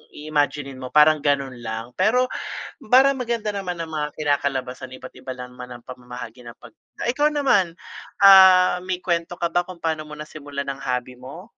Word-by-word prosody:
iimaginin 145 -3 -2
mo 130 - -6
parang 150 +1 +6
ganun 140 -3 -1
lang. 115 +1 -6
Pero 250 +3 +3 0.5
parang 265 +4 +5
maganda 235 -4 -2
naman 185 -3 -4
ang 165 -1 -6
mga 150 -1 -2
kinakalabasan 130 -3 -2
iba't 130 - -11
iba 130 - -6
lang 125 0 -9
naman 125 -1 -9
ang 120 - -24
pamamahagi 125 -1 -9
ng 120 - -12
pag - - -15 0.2
ah, - - -3
ikaw 295 +3 +2
naman, 205 - +1 0.5
ah, 190 -2 +8
may 185 0 -3
kwento 170 -1 -1
ka 170 - 0
ba 175 - +2
kung 185 -2 -10
paano 160 -1 -1
mo 150 - -9
nasimulan 145 -2 -7
ng 135 -1 -4
hobby 125 -1 -3
mo? 135 +8 -10
150 Hz, 180 wpm, -22 LUFS, 130-185 Hz, 0.5 s, ah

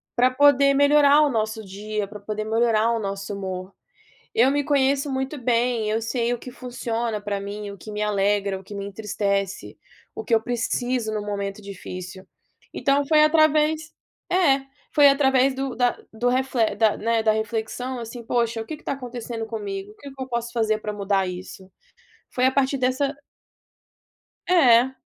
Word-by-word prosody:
para 250 +1 +4
poder 280 0 +5
melhorar 285 +1 +5
o 295 - +4
nosso 220 -2 -2
dia, 205 +1 -4
para 210 0 -10
poder 215 +1 -4
melhorar 225 0 +2
o 230 - 0
nosso 195 0 -4
humor. 185 -1 -5 0.6
Eu 245 +4 +5
me 285 +1 +1
conheço 280 0 +2
muito 265 +2 -3
bem, 235 -3 +1
eu 220 - 0
sei 235 +1 -1
o - - -6
que 250 - -9
funciona 235 -3 -3
para 205 -1 -3
mim, 205 +1 -6
o 200 - -10
que 215 - -10
me 210 0 -3
alegra, 200 -1 +1
o - - -17
que 205 - -10
me 200 - -4
entristece, 200 -1 -3 0.4
o - - -5
que 235 - +2
eu 220 - +4
preciso 245 -1 -1
no 210 -1 -2
momento 200 0 -4
difícil. 185 -1 -8 0.5
Então 280 0 +1
foi 305 0 +5
através 310 0 +3 0.4
é, 335 -7 +4 0.3
foi 290 -2 +7
através 270 -1 +3
do 265 -2 -3
da 245 0 +1
do 230 +3 0
refle 250 -4 +1
da 215 0 +3
né, 230 +1 0
da 220 -1 +3
reflexão, 220 +4 -3
assim: 235 +1 -7
"Poxa, 235 -1 0
o - - -12
quê 310 - -6
que - - -20
está - - -2
acontecendo 240 -3 -5
comigo? 205 -3 -5
O - - -23
que 280 - -10
que 270 -1 -8
eu 260 - -6
posso 235 -1 -3
fazer 220 -2 +1
para 210 - -4
mudar 200 -2 0
isso?" 185 +1 -9 0.6
Foi 255 - +2
a 260 - +4
partir 275 0 +1
dessa 260 +3 0 1.3
É. 265 -7 +5
230 Hz, 180 wpm, -23 LUFS, 210-265 Hz, 1.3 s, foi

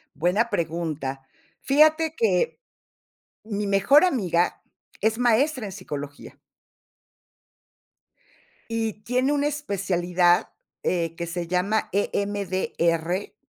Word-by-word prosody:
buena 190 +9 +1
pregunta. 160 -7 -3 0.4
Fíjate 310 +3 +3
que, 195 - +1 0.8
mi 205 -2 -3
mejor 200 - +5
amiga 180 - 0 0.4
es 220 +1 +1
maestra 245 +2 +2
en 195 - -6
psicología. 145 -6 -8 2.3
Y 225 -2 -3
tiene 255 +4 +1
una 290 0 +1
especialidad, 180 -10 +1 0.3
eh, 165 -2 -1
que 170 0 -5
se 170 0 -4
llama 185 +5 0
E-M-D-R, 190 -3 -1
200 Hz, 90 wpm, -24 LUFS, 175-235 Hz, 2.3 s, mejor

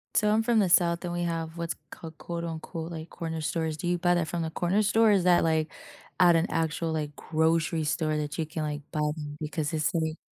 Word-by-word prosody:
So 210 -1 +4
I'm 220 +1 +3
from 235 -1 +3
the 190 -3 +3
south 170 0 +4
and 175 - -3
we 175 0 -1
have 165 -1 -3
what's 170 0 -2 0.2
called 160 -1 -10
quote 170 -1 -5
unquote, 165 0 -5
like 160 0 -7
"corner 160 -1 -4
stores." 160 0 -1
Do 175 - -4
you 175 0 +2
buy 175 0 +2
that 170 -2 +1
from 170 0 -2
the 160 - -3
corner 185 +6 +1
store? 220 +2 +4
Or - - +6
is 195 -3 +3
that, 180 -1 +5
like, 160 -1 +1 0.5
at 175 -2 +7
an 165 +2 +3
actual, 165 0 -1
like, 150 -2 -3
grocery 160 0 +1
store 155 +1 0
that 150 +1 -3
you 160 - 0
can, 155 +1 -5
like, 150 -1 -3
buy 155 - -2 0.2
them 145 -1 -6
because 155 0 -3
it's 155 -2 +1
like 160 -1 -1
165 Hz, 245 wpm, -28 LUFS, 155-175 Hz, 0.5 s, at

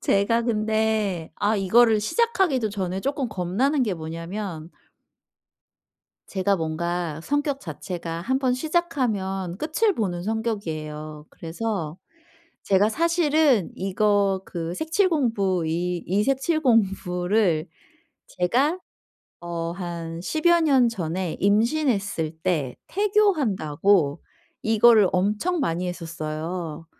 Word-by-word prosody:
제가 215 +4 +2
근데 215 -5 0
아 210 +2 +1
이거를 220 +3 +4
시작하기도 310 - +1
전에 190 -2 -3
쪼끔 275 +1 -2
겁나는 215 - 0
게 215 -6 0
뭐냐면 165 +1 -6 1.6
제가 195 0 0
뭔가 165 0 -3
성격 290 - -1
자체가 165 0 -6
한번 260 +4 +1
시작하면 240 - -1
끝을 355 +7 +1
보는 175 -5 -2
성격이에요. 155 -9 -4
그래서 170 -2 -4 0.7
제가 200 +2 +3
사실은 305 - +2
이거 195 0 +1
그 170 -1 -4
색칠 325 - +1
공부. 200 - +1
이 175 +2 -2
이 200 +4 +1
색칠 275 +5 +1
공부를 195 - +1 0.6
제가 265 - +1 0.6
어 170 -1 -4
한 170 -2 -6
십여 340 - +2
년 270 -6 +4
전에 180 -4 -3
임신했을 205 - +1
때 150 -9 -1
태교한다고 205 - +2 0.4
이거를 220 -2 +5
엄청 210 - 0
많이 180 -6 -1
했었어요. 165 -1 -5
200 Hz, 220 characters per minute, -24 LUFS, 170-250 Hz, 1.6 s, 이거를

